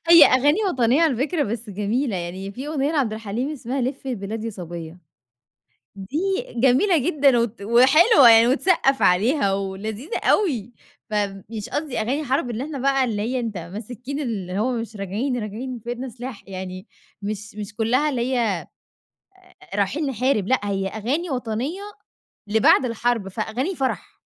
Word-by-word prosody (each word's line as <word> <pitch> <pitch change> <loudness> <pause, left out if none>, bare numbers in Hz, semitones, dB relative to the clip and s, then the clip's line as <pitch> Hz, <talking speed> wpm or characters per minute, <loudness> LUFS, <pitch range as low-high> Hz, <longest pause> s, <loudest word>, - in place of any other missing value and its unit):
هي 335 -2 +10
أغاني 290 +7 +4
وطنية 255 0 +2
على 310 -7 +3
فكرة 295 +5 0
بس 225 -1 -4
جميلة. 210 +4 -1
يعني 185 +3 -5
في 260 +7 -7
أغنية 295 0 -1
لعبد 265 -8 +1
الحليم 225 +5 -3
اسمها 265 -1 -4
لفّي 265 +2 -3
البلاد 215 0 -4
يا 230 - -2
صَبيّة. 170 -3 -8 1.0
دي 195 +10 -5 0.4
جميلة 265 - +4
جدًا 280 -3 +3
وت 235 -2 -2
وحلوة 260 - +6
يعني 225 +1 +7
وتسقَّف 275 0 +2
عليها 200 - +3
ولذيذة 205 - -4
أوي. 245 - +1 0.4
فمش 205 +1 -3
قصدي 295 -3 -3
أغاني 265 +8 -1
حرب 260 -2 0
إن 235 0 -3
إحنا 290 +1 -5
بقى 270 0 +2
اللي 215 -5 -1
هي 250 +4 -1
أنت 225 -5 -4
ماسكين 225 - -6
اللي 200 -8 -3
هو 255 +4 +1
مش 230 -2 -4
راجعين، 215 +7 -2
راجعين 230 +5 -5
وفي 235 0 -9
إيدنا 245 +2 -4
سلاح، 245 -1 -8
يعني 185 -1 -7 0.3
مش 210 +1 -5
مش 205 -1 -7
كُلّها 250 +7 +2
اللي 250 -4 -2
هي 255 - +1
آآ 205 -7 0 1.1
رايحين 205 +10 0
نحارب، 255 -5 0
لأ، 260 +2 +3
هي 195 -1 -1
أغاني 265 - -2
وطنية 250 - -3 0.7
لبعد 220 +5 +4
الحرب، 230 -3 -1
فأغاني 230 - -3
فرح. 265 -3 -3
235 Hz, 155 wpm, -23 LUFS, 205-270 Hz, 1.1 s, هي